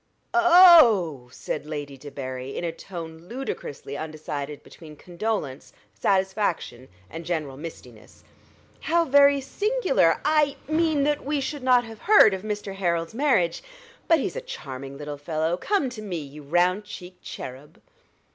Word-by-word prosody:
"O 355 - +4
o 350 0 +9
oh!" 170 - 0
said 150 +3 -5
Lady 145 -2 -5
Debarry, 135 -1 -7
in - - -4
a 170 - -1
tone 165 -2 -9
ludicrously 210 - -6
undecided 150 -2 -6
between 155 -2 -13
condolence, 175 -5 -4 0.2
satisfaction, 190 - -1 0.2
and 165 - -8
general 155 -5 -3
mistiness. 130 -7 -11 0.6
"How 335 +1 +1
very 280 0 +5
singular 275 - +1
I 300 -2 +3
mean 315 -2 +1
that 295 0 0
we 290 +1 -1
should 280 +1 -4
not 250 -1 +4
have 225 -2 -11
heard 410 - +6
of 190 - -4
Mr. 205 -1 -4
Harold's 170 -3 -1
marriage. 230 - +1 0.5
But 330 - +5
he's - - -3
a - - -4
charming 135 - -8
little 145 0 -7
fellow: 160 +2 -1
come 345 - 0
to 225 -3 -8
me, 195 -5 -4
you 150 -1 -9
round 175 +7 +1
cheeked 180 -3 -11
cherub." 130 +3 -9
180 Hz, 145 wpm, -25 LUFS, -, 0.6 s, o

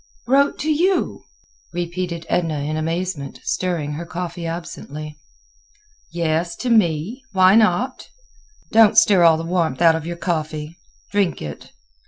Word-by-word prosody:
"Wrote 275 +3 +3
to 310 - 0
you?" 360 +5 0 0.5
repeated 175 -1 -4
Edna 160 -4 0
in 150 +2 -2
amazement, 165 -2 -3
stirring 170 -5 -2
her 160 +4 -5
coffee 175 -1 -5
absently. 155 -3 -7 0.9
"Yes, 165 0 -1
to 250 - -2
me. 200 - +1
Why 185 0 +6
not? 225 +4 +2 0.6
Don't 220 -1 +5
stir 195 -4 +6
all 165 -1 +6
the 165 - -4
warmth 165 -5 0
out 165 -1 +6
of 160 0 -5
your 170 0 -5
coffee; 155 -2 -3 0.4
drink 200 -4 +1
it. 75 -1 -8
170 Hz, 135 wpm, -21 LUFS, 160-185 Hz, 0.9 s, Why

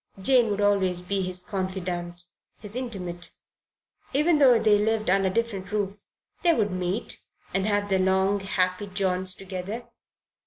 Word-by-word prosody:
Jane 240 +3 +4
would 205 0 -1
always 195 -3 +2
be 195 +2 -1
his 180 -1 -3
confidante, 180 -2 -4 0.3
his 210 +1 -8
intimate. 185 -9 -4 0.9
Even 305 +2 +3
though 255 -4 +7
they 210 -2 +4
lived 215 -2 +1
under 195 0 +3
different 200 -2 -2
roofs, 205 -1 -2 0.3
they 340 -2 +4
would 205 -3 +1
meet 185 +3 -3 0.3
and 195 +1 +1
have 205 -1 +1
their 190 -1 +2
long 190 +2 +2
happy 190 0 -1
jaunts 185 -1 0
together. 195 +4 -6
195 Hz, 145 wpm, -26 LUFS, 185-210 Hz, 0.9 s, though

